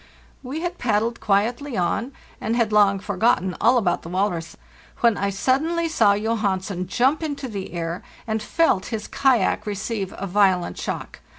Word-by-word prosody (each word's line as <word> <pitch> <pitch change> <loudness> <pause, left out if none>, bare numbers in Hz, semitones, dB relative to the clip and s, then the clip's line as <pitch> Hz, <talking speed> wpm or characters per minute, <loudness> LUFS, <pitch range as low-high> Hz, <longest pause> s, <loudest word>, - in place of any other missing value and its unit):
We 280 +5 -5
had 350 0 -2
_ - - -29
paddled 230 0 0
quietly 230 +6 0
on, 200 +8 0 0.3
and 225 - -1
had 230 -3 +1
long 200 -1 +5
forgotten 195 -1 +1
all 240 +4 +5
about 195 -7 +1
the 165 - -9
walrus, 180 -3 -2 0.4
when 235 -3 +4
I 200 0 -1
suddenly 305 - +1
saw 220 -11 +4
Johansen 200 -4 -1
jump 260 - +2
into 290 -4 -3
the 200 -5 -6
air 170 0 -3 0.2
and 220 -2 -2
felt 215 - +1
his 220 -2 -4
kayak 255 -5 +2
receive 205 -1 -3
a 195 - -4
violent 185 - +2
shock. - - -5
210 Hz, 165 wpm, -23 LUFS, 195-245 Hz, 0.4 s, long